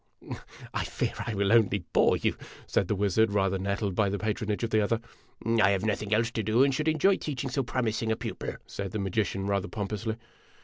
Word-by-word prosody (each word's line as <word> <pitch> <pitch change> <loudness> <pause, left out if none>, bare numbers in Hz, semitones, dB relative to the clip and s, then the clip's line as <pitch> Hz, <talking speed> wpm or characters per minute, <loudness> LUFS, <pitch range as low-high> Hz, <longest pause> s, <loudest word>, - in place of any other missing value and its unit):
" - - -8
" - - -15
I - - 0
fear - - -2
I 115 - -2
will 100 +1 +2
only 100 -5 +3
bore - - +4
you," - - 0 0.3
said 95 - +1
the 105 - 0
wizard, 100 +2 +2
rather 95 -1 +1
nettled 100 +1 -1
by 100 +2 +2
the 100 - -1
patronage 105 0 -2
of 115 - -1
the 110 - +4
other. 110 +2 +1 0.4
" - - -18 0.2
I 100 - +6
have 100 +1 +1
nothing 105 -1 -1
else 115 +2 +2
to 115 - -1
do, 110 +5 +3
and 140 -1 +3
should 150 +4 -1
enjoy 160 +5 +4
teaching 135 -3 -4
so 135 - +1
promis 120 -3 -1
ing 110 -1 0
a - - +2
pupil," - - -5
said 100 -2 -5
the - - -1
magician, 95 0 -1
rather 100 0 0
pompously. 105 +2 -3
105 Hz, 230 wpm, -28 LUFS, 100-115 Hz, 0.4 s, I